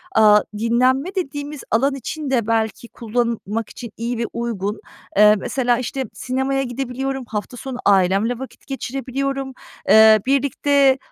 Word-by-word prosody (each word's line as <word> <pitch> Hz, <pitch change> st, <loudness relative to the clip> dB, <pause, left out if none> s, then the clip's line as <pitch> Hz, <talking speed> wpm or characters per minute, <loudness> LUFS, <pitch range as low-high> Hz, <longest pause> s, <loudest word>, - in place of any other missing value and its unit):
Aaa, 210 Hz, -1 st, +6 dB, 0.2 s
dinlenme 255 Hz, -, +1 dB
dediğimiz 290 Hz, -4 st, -4 dB
alan 270 Hz, +5 st, +2 dB
için 285 Hz, +3 st, -5 dB
de 240 Hz, -5 st, +1 dB
belki 225 Hz, 0 st, -1 dB
kullanmak 230 Hz, -2 st, -2 dB
için 235 Hz, -3 st, -9 dB
iyi 235 Hz, +1 st, -3 dB
ve 235 Hz, -, -1 dB
uygun. 215 Hz, -3 st, -3 dB, 0.4 s
Eee, 210 Hz, +1 st, +7 dB
mesela, 245 Hz, 0 st, 0 dB
işte, 260 Hz, +1 st, -3 dB
sinemaya 265 Hz, +1 st, -1 dB
gidebiliyorum, 265 Hz, +1 st, -4 dB
hafta 215 Hz, +2 st, -5 dB
sonu 260 Hz, 0 st, -6 dB
ailemle 200 Hz, +5 st, +3 dB
vakit 265 Hz, -, -10 dB
geçirebiliyorum, 270 Hz, 0 st, -3 dB, 0.4 s
eee, 220 Hz, 0 st, +8 dB
birlikte 275 Hz, 0 st, +3 dB
245 Hz, 130 wpm, -20 LUFS, 225-270 Hz, 0.4 s, eee